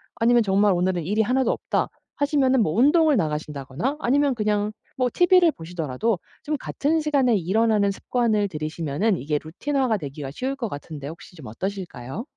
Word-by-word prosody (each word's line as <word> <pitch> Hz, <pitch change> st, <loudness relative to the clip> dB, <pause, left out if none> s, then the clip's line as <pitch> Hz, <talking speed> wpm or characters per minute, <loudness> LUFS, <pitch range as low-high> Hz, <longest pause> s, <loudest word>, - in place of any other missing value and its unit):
아니면 235 Hz, 0 st, +4 dB
정말 200 Hz, 0 st, +3 dB
"오늘은 180 Hz, -1 st, 0 dB
일이 210 Hz, +5 st, +1 dB
하나도 250 Hz, +3 st, +2 dB
없다." -, -, -1 dB, 0.3 s
하시면은 280 Hz, -3 st, +2 dB
뭐 155 Hz, -, -1 dB
운동을 295 Hz, -, +4 dB
나가신다거나 150 Hz, -, -2 dB
아니면 280 Hz, 0 st, +2 dB
그냥 210 Hz, -1 st, 0 dB, 0.3 s
뭐 255 Hz, -1 st, +1 dB
티브이를 355 Hz, -1 st, +5 dB
보시더라도 165 Hz, -, -2 dB, 0.2 s
좀 305 Hz, 0 st, -1 dB
같은 310 Hz, +4 st, -1 dB
시간에 275 Hz, -6 st, +2 dB
일어나는 205 Hz, +2 st, +2 dB
습관을 215 Hz, 0 st, 0 dB
들이시면은 160 Hz, +4 st, -1 dB
이게 150 Hz, 0 st, -1 dB
루틴화가 255 Hz, -, -1 dB
되기가 140 Hz, -4 st, -6 dB
쉬울 260 Hz, -, -3 dB
것 240 Hz, -5 st, -4 dB
같은데 145 Hz, -2 st, -7 dB
혹시 170 Hz, +3 st, -12 dB
좀 150 Hz, -6 st, -11 dB
어떠실까요? 180 Hz, -, -5 dB
210 Hz, 415 characters per minute, -24 LUFS, 160-260 Hz, 0.3 s, 티브이를